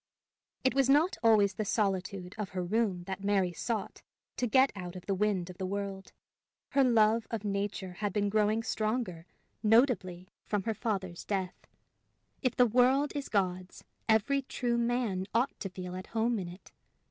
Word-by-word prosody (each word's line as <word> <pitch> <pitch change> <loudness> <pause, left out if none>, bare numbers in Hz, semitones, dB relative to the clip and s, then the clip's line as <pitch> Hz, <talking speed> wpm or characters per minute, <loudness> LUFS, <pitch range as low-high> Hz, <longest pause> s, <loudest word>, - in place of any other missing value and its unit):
It 260 - +3
was 270 -1 +3
not 305 +7 +4
always 215 -4 +5
the 215 - -2
solitude 195 -3 -1
of 205 -3 -3
her 180 - 0
room 195 -1 0
that 190 +1 -6
Mary 195 -3 +1
sought 220 +1 -3 0.4
to 245 - 0
get 260 +4 +4
out 180 -2 -7
of 180 - -9
the 200 - 0
wind 190 -3 0
of 180 - -16
the 190 - -2
world. 195 0 -4 0.6
Her 275 - +3
love 225 -2 +3
of 225 -3 -3
nature 200 -2 -2
had 205 +3 -2
been 205 +2 0
growing 215 +2 +2
stronger, 215 -7 -2 0.3
notably, 210 -6 +2 0.2
from 205 -2 -1
her 225 - -1
father's 195 -5 -3
death. 190 -3 -3 0.7
If 255 - 0
the 250 - +6
world 255 +5 +3
is 285 -1 -4
God's, 185 -2 -1 0.3
every 225 +6 +3
true 245 -3 -1
man 235 -6 0
ought 250 +4 +1
to 195 - -4
feel 180 -1 -7
at 185 0 -7
home 230 0 0
in 180 - -4
it. 180 +3 -12
205 Hz, 170 wpm, -31 LUFS, 185-235 Hz, 0.7 s, the